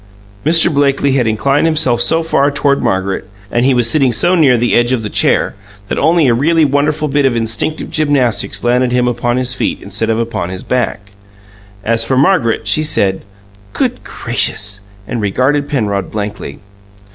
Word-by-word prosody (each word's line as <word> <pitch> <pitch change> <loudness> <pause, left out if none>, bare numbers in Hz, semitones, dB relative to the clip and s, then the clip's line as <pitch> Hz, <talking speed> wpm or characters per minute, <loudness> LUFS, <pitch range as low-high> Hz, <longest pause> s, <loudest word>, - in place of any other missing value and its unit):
Mr. 160 +1 +3
Blakely 140 0 +1
had 130 -3 +1
inclined 135 +8 +1
himself 150 -7 +1
so 160 +7 +3
far 145 -3 +1
toward 140 -1 0
Margaret, 95 +1 -2 0.2
and 120 - +1
he 135 - +2
was 120 -2 +3
sitting 135 +1 +2
so 175 +9 +1
near 145 -8 +4
the 120 +1 0
edge 120 +1 +2
of 120 -3 -2
the 105 - -5
chair, - - +1 0.4
that - - -2
only 160 0 +3
a 120 - +3
really 160 +6 +2
wonderful 150 +2 0
bit 145 0 0
of 130 -3 +1
instinctive 115 +7 -3
gymnastics 145 -7 0
landed 125 +1 +1
him 125 0 +1
upon 120 0 -1
his 125 -1 -1
feet - - -2
instead - - -3
of 110 - +1
upon 115 -7 -3
his 95 0 -7
back. 115 -5 -3 0.7
As 115 0 +1
for 130 +3 -1
Margaret, 130 - +1
she 105 +9 +3
said, 100 -11 0 0.5
"Good - - -2
gracious!" 105 0 -1 0.3
and 120 - -3
regarded 135 +8 0
Penrod 100 -8 -2
blankly. 105 -8 -6
125 Hz, 175 wpm, -14 LUFS, 115-145 Hz, 0.7 s, near